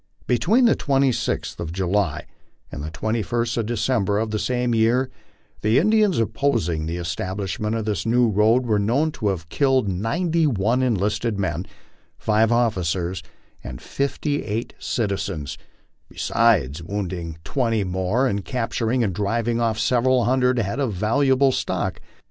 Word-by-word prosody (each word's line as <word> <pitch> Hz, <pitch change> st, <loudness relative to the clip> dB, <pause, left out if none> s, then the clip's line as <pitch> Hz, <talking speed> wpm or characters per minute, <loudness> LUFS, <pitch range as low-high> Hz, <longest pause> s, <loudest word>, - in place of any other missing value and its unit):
Be 125 Hz, -, +1 dB
tween 235 Hz, +7 st, +4 dB
the 230 Hz, -, +5 dB
26th 135 Hz, -3 st, 0 dB
of 85 Hz, -2 st, -4 dB
July 90 Hz, -2 st, -1 dB, 0.5 s
and 70 Hz, -, -6 dB
the 80 Hz, -, -4 dB
21st 115 Hz, +7 st, -2 dB
of 115 Hz, -2 st, -1 dB
December 110 Hz, -3 st, 0 dB
of 110 Hz, 0 st, -1 dB
the 110 Hz, -, -1 dB
same 125 Hz, 0 st, 0 dB
year, 120 Hz, +4 st, +2 dB, 0.5 s
the 110 Hz, +3 st, +3 dB
Indians 210 Hz, +3 st, +3 dB
opposing 105 Hz, -, 0 dB
the 85 Hz, +2 st, -3 dB
establishment 95 Hz, +5 st, -3 dB
of 110 Hz, -2 st, -2 dB
this 105 Hz, -2 st, -1 dB
new 120 Hz, +1 st, +3 dB
road 110 Hz, +4 st, +3 dB
were 110 Hz, -3 st, +2 dB
known 130 Hz, +10 st, +1 dB
to 110 Hz, -8 st, -3 dB
have 90 Hz, -5 st, -2 dB
killed 135 Hz, -, +2 dB
ninety 155 Hz, -, 0 dB
one 115 Hz, +1 st, +1 dB
enlisted 105 Hz, -1 st, 0 dB
men, 90 Hz, -2 st, -2 dB, 0.5 s
five 110 Hz, +1 st, +2 dB
officers, 95 Hz, -7 st, 0 dB, 0.4 s
and -, -, -7 dB
fifty 145 Hz, +1 st, -2 dB
eight 110 Hz, +3 st, -3 dB
citizens, 95 Hz, -, -3 dB, 0.5 s
besides 85 Hz, -, +1 dB
wounding 85 Hz, -3 st, -4 dB
twenty 115 Hz, -4 st, 0 dB
more 95 Hz, +7 st, 0 dB
and 100 Hz, -6 st, -1 dB
capturing 120 Hz, 0 st, -1 dB
and 100 Hz, -4 st, -1 dB
driving 115 Hz, +4 st, -1 dB
off 115 Hz, -2 st, +1 dB
several 125 Hz, +2 st, +2 dB
hundred 125 Hz, 0 st, +2 dB
head 115 Hz, +3 st, -1 dB
of 130 Hz, -6 st, 0 dB
valuable 130 Hz, +7 st, +3 dB
stock. -, -, -2 dB
110 Hz, 145 wpm, -23 LUFS, 95-125 Hz, 0.5 s, the